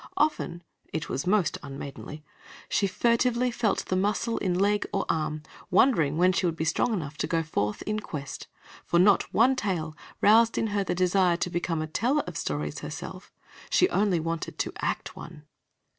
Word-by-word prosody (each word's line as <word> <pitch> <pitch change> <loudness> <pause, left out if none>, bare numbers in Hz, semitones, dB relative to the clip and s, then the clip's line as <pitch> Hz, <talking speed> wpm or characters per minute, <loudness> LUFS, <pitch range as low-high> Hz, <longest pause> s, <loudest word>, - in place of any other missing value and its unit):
Often 290 - 0 0.3
it 160 - -4
was 135 +6 -3
most 185 -6 +2
unmaidenly 140 +2 -8 0.4
she 200 - +1
furtively 240 +4 +2
felt 230 -3 0
of - - -21
her - - +3
muscle 210 +4 0
in 180 -2 0
leg 205 +2 +2
or 195 - -1
arm, 155 -1 -1 0.3
wondering 175 - +3
when 180 +2 +5
she 185 0 +1
would 165 - -1
be 160 - -2
strong 165 +8 +1
enough 155 -8 -3
to - - -1
go 165 -1 0
forth 105 -9 -2
in 215 0 -2
quest, 145 -9 -7 0.4
for 170 - +1
not 195 +3 +4
one 250 +4 +4
tale 175 -9 -2 0.2
roused 225 +2 +5
in 225 - +1
her 200 -1 +1
the 185 - -2
desire 180 -1 +3
to 180 - -2
become 165 -2 -1
a - - -2
teller 245 - +1
of 180 - -7
stories 75 - -3
herself - - -8 0.4
she - - +4
only 195 -2 +2
wanted 165 +1 -4
to - - -2
act - - -3
one. 165 -3 -10
180 Hz, 185 wpm, -27 LUFS, 155-210 Hz, 0.4 s, when